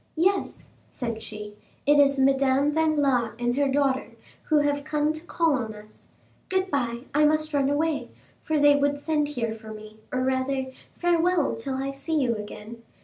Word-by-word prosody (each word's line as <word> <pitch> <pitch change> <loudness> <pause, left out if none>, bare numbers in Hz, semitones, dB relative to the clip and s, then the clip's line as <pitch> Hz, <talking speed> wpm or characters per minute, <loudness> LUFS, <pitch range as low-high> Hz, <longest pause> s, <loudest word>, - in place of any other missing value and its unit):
"Yes," 380 +4 0 0.2
said 230 -3 -5
she, 210 -1 -7 0.3
"it 290 +1 +5
is 280 -1 +4
Madame 270 +1 +3
Danglars 290 -8 +1
and 240 0 0
her 285 0 +2
daughter, 270 -1 0 0.3
who 310 - +3
have 290 -1 +1
come 300 0 0
to 315 +1 -8
call 330 -2 +1
on 225 -5 -2
us. 210 0 -16 0.4
Good 375 0 0
bye;—I 260 +2 0
must 310 +1 +1
run 280 -1 +2
away, 305 +1 0 0.3
for 315 -1 0
they 290 0 +6
would 285 0 +1
send 300 0 0
here 235 -6 -3
for 220 -1 -10
me, 215 0 -11
or, 255 0 0
rather, 260 0 -1 0.3
farewell 345 -2 +2
till 260 +4 -4
I 270 +1 -2
see 280 +4 -4
you 245 -4 +1
again. 215 +2 -8
275 Hz, 170 wpm, -26 LUFS, 245-300 Hz, 0.4 s, they